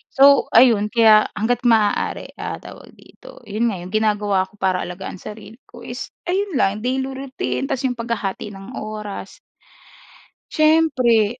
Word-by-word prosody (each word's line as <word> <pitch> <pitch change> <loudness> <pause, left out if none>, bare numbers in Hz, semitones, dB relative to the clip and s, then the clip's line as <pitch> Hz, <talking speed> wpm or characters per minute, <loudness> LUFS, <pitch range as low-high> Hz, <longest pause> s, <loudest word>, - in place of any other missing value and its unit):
So 280 +1 +6
ayun 225 -4 +5
kaya, 220 -2 +5
hangga't 235 +3 0
maaari, 220 -3 +1
ah, - - -5
tawag - - -13
dito? - - -16
'Yun 225 +3 0
nga 200 - -4
yung 180 +1 -9
ginagawa 205 -3 +1
ko 210 - -24
para 185 -2 0
alagaan 180 +1 -7
sarili 215 +3 -11
ko 240 -1 -13
is 245 +1 -6 0.2
ayun 380 -2 -1
lang 210 -2 +1
daily 260 +3 -1
routine 270 +1 -4
ta's 270 -1 -2
yung 255 - +1
paghahati 230 -4 -4
ng 195 +4 -11
oras 215 -1 -7 1.1
siyempre, 260 -8 +3
225 Hz, 145 wpm, -20 LUFS, 210-260 Hz, 1.1 s, So